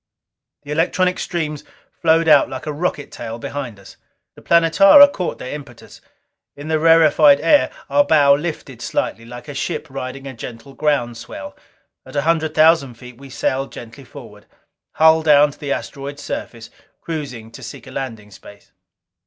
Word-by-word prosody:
The 145 Hz, -, -9 dB
electronic 180 Hz, +3 st, 0 dB
streams 155 Hz, -4 st, -4 dB, 0.4 s
flowed 165 Hz, 0 st, +3 dB
out 155 Hz, -, +5 dB
like 130 Hz, -1 st, -7 dB
a 150 Hz, -, -4 dB
rocket 150 Hz, -2 st, -3 dB
tail 115 Hz, -1 st, -7 dB
behind 120 Hz, -3 st, -6 dB
us. 100 Hz, -, -16 dB, 0.4 s
The -, -, -17 dB
Planetara 195 Hz, -, +6 dB
caught 180 Hz, -3 st, -4 dB
their 125 Hz, -, -7 dB
impetus. 140 Hz, -5 st, -11 dB, 0.5 s
In 145 Hz, +2 st, -9 dB
the 160 Hz, -1 st, +1 dB
rarefied 155 Hz, -3 st, +5 dB
air, 155 Hz, -5 st, +3 dB, 0.2 s
our 145 Hz, +1 st, +3 dB
bow 145 Hz, -1 st, +4 dB
lifted 140 Hz, -5 st, -4 dB
slightly, 115 Hz, -, -3 dB
like 120 Hz, 0 st, -10 dB
a 145 Hz, -, -7 dB
ship 150 Hz, +2 st, -4 dB
riding 135 Hz, 0 st, -7 dB
a 135 Hz, -, -7 dB
gentle 115 Hz, +2 st, -10 dB
ground 135 Hz, -6 st, -1 dB
swell. 290 Hz, -, -9 dB, 0.5 s
At -, -, -14 dB
a 145 Hz, -, 0 dB
hundred 160 Hz, -1 st, 0 dB
thousand 155 Hz, -5 st, +3 dB
feet 125 Hz, +1 st, -14 dB
we 140 Hz, 0 st, -12 dB
sailed 135 Hz, +1 st, -2 dB
gently 120 Hz, +4 st, -11 dB
forward, 120 Hz, -, -14 dB, 0.5 s
hull 160 Hz, 0 st, +4 dB
down 150 Hz, -2 st, +4 dB
to -, -, -19 dB
the 140 Hz, -1 st, -5 dB
asteroid's 140 Hz, +1 st, -6 dB
surface, 115 Hz, -1 st, -7 dB, 0.3 s
cruising 130 Hz, -9 st, -6 dB
to 115 Hz, -, -12 dB
seek -, -, -10 dB
a 130 Hz, -, -12 dB
landing 115 Hz, -6 st, -7 dB
space. 100 Hz, +1 st, -16 dB
145 Hz, 165 wpm, -19 LUFS, 130-160 Hz, 0.5 s, Planetara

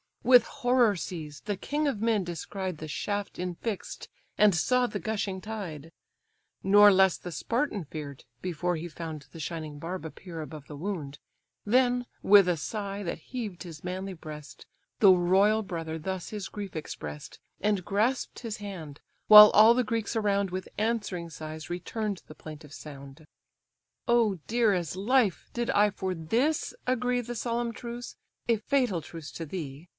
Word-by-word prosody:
With 245 Hz, -1 st, +7 dB
horror 245 Hz, -5 st, +2 dB
seized, 155 Hz, -4 st, -7 dB
the 205 Hz, -2 st, -2 dB
king 295 Hz, +7 st, -1 dB
of 220 Hz, -7 st, -1 dB
men 225 Hz, -3 st, +2 dB
descried 180 Hz, +1 st, -5 dB
The 155 Hz, -, -7 dB
shaft 205 Hz, +6 st, -3 dB
infix'd, 180 Hz, +4 st, -4 dB, 0.3 s
and 210 Hz, -1 st, +6 dB
saw 250 Hz, +9 st, +2 dB
the -, -, -3 dB
gushing 200 Hz, -4 st, -2 dB
tide: 175 Hz, -8 st, -6 dB, 0.7 s
Nor 205 Hz, +1 st, +8 dB
less 190 Hz, -2 st, +4 dB
the 180 Hz, -, -8 dB
Spartan 230 Hz, -, -1 dB
fear'd, 145 Hz, -3 st, -8 dB, 0.2 s
before 180 Hz, 0 st, -1 dB
he 165 Hz, +2 st, -5 dB
found 160 Hz, -3 st, -7 dB
The 165 Hz, -, -10 dB
shining 155 Hz, -1 st, -5 dB
barb 170 Hz, +2 st, -5 dB
appear 165 Hz, +1 st, -8 dB
above 155 Hz, -2 st, -9 dB
the 150 Hz, -, -8 dB
wound, 150 Hz, -4 st, -4 dB, 0.5 s
Then, 245 Hz, +2 st, +3 dB, 0.2 s
with 200 Hz, -2 st, +7 dB
a 175 Hz, -2 st, +2 dB
sigh, 200 Hz, +4 st, -4 dB
that 170 Hz, -, -3 dB
heaved 215 Hz, -9 st, -5 dB
his 165 Hz, -3 st, -10 dB
manly 185 Hz, +2 st, -4 dB
breast, 155 Hz, -3 st, -10 dB, 0.3 s
The 200 Hz, -3 st, +8 dB
royal 190 Hz, +5 st, +4 dB
brother 165 Hz, -4 st, -4 dB
thus 190 Hz, +2 st, -4 dB
his 210 Hz, -3 st, -5 dB
grief 200 Hz, -4 st, -7 dB
express'd, 75 Hz, -, -7 dB, 0.2 s
And 205 Hz, -2 st, +1 dB
grasp'd 225 Hz, +6 st, 0 dB
his 230 Hz, -3 st, -5 dB
hand; 175 Hz, -8 st, -8 dB, 0.3 s
while 210 Hz, 0 st, +12 dB
all 220 Hz, +2 st, +8 dB
the 250 Hz, +1 st, +2 dB
Greeks 225 Hz, 0 st, -2 dB
around 200 Hz, -3 st, +1 dB
With 185 Hz, 0 st, -5 dB
answering 205 Hz, -6 st, -1 dB
sighs 155 Hz, 0 st, -7 dB
return'd 200 Hz, +3 st, -3 dB
the 155 Hz, -, -11 dB
plaintive 155 Hz, -1 st, -10 dB
sound. 140 Hz, 0 st, -11 dB, 0.8 s
"Oh, 235 Hz, -4 st, +3 dB
dear 230 Hz, -2 st, +3 dB
as 175 Hz, -3 st, -2 dB
life! 215 Hz, +1 st, +1 dB
did 240 Hz, 0 st, -2 dB
I 210 Hz, +1 st, +4 dB
for 190 Hz, -1 st, -3 dB
this 235 Hz, -, 0 dB
agree 250 Hz, 0 st, +1 dB
The 240 Hz, +1 st, -6 dB
solemn 235 Hz, +1 st, -1 dB
truce, 240 Hz, +1 st, -7 dB, 0.3 s
a 230 Hz, -1 st, +3 dB
fatal 235 Hz, -5 st, +1 dB
truce 155 Hz, 0 st, -9 dB
to 165 Hz, -, -5 dB
thee! 155 Hz, -1 st, -7 dB
195 Hz, 160 wpm, -28 LUFS, 165-220 Hz, 0.8 s, while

